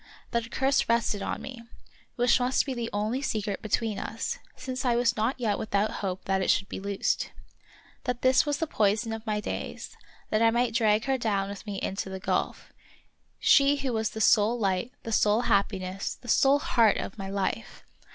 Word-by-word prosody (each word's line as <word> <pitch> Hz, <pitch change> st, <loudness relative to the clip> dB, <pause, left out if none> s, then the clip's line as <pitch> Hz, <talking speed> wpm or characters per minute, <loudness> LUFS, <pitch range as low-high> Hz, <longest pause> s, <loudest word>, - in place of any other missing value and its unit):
That 235 Hz, -1 st, -1 dB
a -, -, -17 dB
curse 270 Hz, +1 st, +1 dB
rested 230 Hz, -3 st, +1 dB
on -, -, -3 dB
me, 255 Hz, -3 st, -8 dB, 0.5 s
which 245 Hz, +1 st, +3 dB
must 250 Hz, +1 st, +2 dB
be 270 Hz, -, -3 dB
the 235 Hz, -2 st, -3 dB
only 215 Hz, +6 st, -1 dB
secret 210 Hz, -6 st, -2 dB
be 215 Hz, -, -7 dB
tween 220 Hz, -1 st, 0 dB
us, 225 Hz, -, -4 dB, 0.2 s
since 255 Hz, +1 st, -5 dB
I 245 Hz, -2 st, +2 dB
was 240 Hz, 0 st, +2 dB
not 230 Hz, +5 st, -1 dB
yet 215 Hz, -4 st, 0 dB
without 210 Hz, 0 st, 0 dB
hope 190 Hz, -2 st, -3 dB
that 190 Hz, 0 st, +1 dB
it -, -, -1 dB
should 195 Hz, -, +2 dB
be -, -, -6 dB
loosed. 200 Hz, 0 st, -1 dB, 0.8 s
That 250 Hz, -1 st, -2 dB
this 255 Hz, 0 st, +5 dB
was 290 Hz, -1 st, -1 dB
the 325 Hz, -, -1 dB
poison 220 Hz, -3 st, +1 dB
of 225 Hz, 0 st, -6 dB
my 210 Hz, -1 st, 0 dB
days; -, -, -5 dB, 0.4 s
that 215 Hz, -, +2 dB
I 230 Hz, -, +6 dB
might 240 Hz, +1 st, +1 dB
drag 220 Hz, -2 st, +2 dB
her 270 Hz, -1 st, 0 dB
down 200 Hz, -4 st, 0 dB
with 200 Hz, +2 st, -8 dB
me 200 Hz, -2 st, -3 dB
into 195 Hz, 0 st, -3 dB
the 190 Hz, 0 st, -5 dB
gulf -, -, -2 dB, 0.3 s
— -, -, -43 dB, 0.3 s
she 280 Hz, +1 st, +5 dB
who 270 Hz, -3 st, -2 dB
was 220 Hz, -1 st, 0 dB
the 220 Hz, -, -6 dB
sole 220 Hz, +2 st, +4 dB
light, 195 Hz, +1 st, -1 dB
the 225 Hz, -, -5 dB
sole 215 Hz, +1 st, +3 dB
happiness, 195 Hz, -4 st, -1 dB
the 245 Hz, -, -16 dB
sole 270 Hz, +3 st, +4 dB
heart 230 Hz, -6 st, +3 dB
of 200 Hz, -, -6 dB
my 195 Hz, 0 st, -5 dB
life. 195 Hz, -1 st, -3 dB
225 Hz, 205 wpm, -27 LUFS, 200-245 Hz, 0.8 s, I